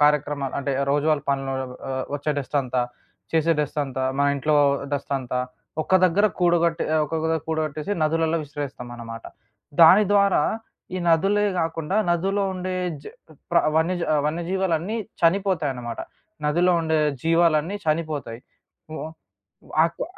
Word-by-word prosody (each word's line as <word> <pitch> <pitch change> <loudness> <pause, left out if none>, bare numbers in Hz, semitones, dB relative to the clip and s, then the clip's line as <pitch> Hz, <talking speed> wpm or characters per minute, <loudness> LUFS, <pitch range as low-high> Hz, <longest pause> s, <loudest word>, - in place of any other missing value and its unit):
కార్యక్రమాలు, 145 -2 +2
అంటే 140 0 -2 0.2
రోజువారి 145 0 +2
పనులో 135 -1 -1 0.4
ఆహ్, 130 0 -2
ఒచ్చే 150 +1 -1
డస్టంతా, 130 -2 -1 0.5
చేసే 165 +1 +3
డస్టంతా, 140 -3 -2 0.2
మా 140 - +3
ఇంట్లో 150 +2 +1 0.4
డస్టంతా 135 -3 -2 0.4
ఒక్క 190 - 0
దగ్గర 195 +4 +4
కూడగట్ట 170 -1 +2 0.3
ఒక్కొక్క 160 +2 -1
కూడగట్టేసి 155 +3 -2
నదులలో 165 +1 +1
విసిరేస్తామన్నమాట. 120 -6 -7 0.6
దాని 170 +6 +9
ద్వారా 200 -6 +4 0.5
ఈ - - -1
నదులే 195 +5 +3
గాకుండా, 165 +3 -1
నదులో 195 +4 +1
ఉండే 185 0 -3 0.3
జ - - -20 0.5
ప్ర 170 - +5 0.2
వన్యజ 175 +3 +1 0.3
వన్యజీవాలన్నీ 175 +4 -1 0.3
చనిపోతాయన్నమాట. 160 - 0 0.5
నదిలో 175 +4 +3
ఉండే 160 -1 +1 0.2
జీవాలన్నీ 165 +2 +2
చనిపోతాయి. 155 -7 -2 0.5
ఓ - - -5 0.7
ఓ - - -19 0.2
అకొ 170 - -2
160 Hz, 115 wpm, -24 LUFS, 145-175 Hz, 0.7 s, దాని